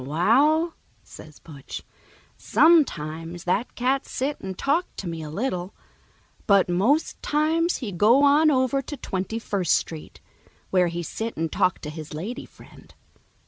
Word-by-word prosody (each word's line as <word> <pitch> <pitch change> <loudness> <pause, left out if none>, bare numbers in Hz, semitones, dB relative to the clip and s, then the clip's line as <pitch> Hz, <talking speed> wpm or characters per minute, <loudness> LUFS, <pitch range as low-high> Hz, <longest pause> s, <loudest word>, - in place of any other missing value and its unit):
"Wa 140 +4 -6
a 220 +9 +4
l," 315 +3 +2 0.3
says 155 -1 -13
Butch, 145 -4 -10 0.5
"sometimes 170 - +2
that 195 +7 -1
cat 260 +2 0
sit 275 +2 -3
and 190 -1 -6
talk 315 +6 +1
to 195 - -6
me 165 -1 -5
a 155 - -7
little, 185 - -3 0.7
but 200 -3 +5
most 220 - +1
times 320 +3 +1
he 230 -7 -5
go 220 +10 +4
on 295 +2 +5
over 260 -1 +1
to 290 +2 -7
Twenty 195 -1 -4
first 200 -6 0
Street, 160 -2 -5 0.5
where 180 -2 +3
he 170 0 -4
sit 225 +7 -5
and 165 0 -2
talk 185 -3 +1
to 150 - -6
his 155 -1 -8
lady 200 +11 -6
friend. - - -18
205 Hz, 155 wpm, -24 LUFS, 170-275 Hz, 0.7 s, but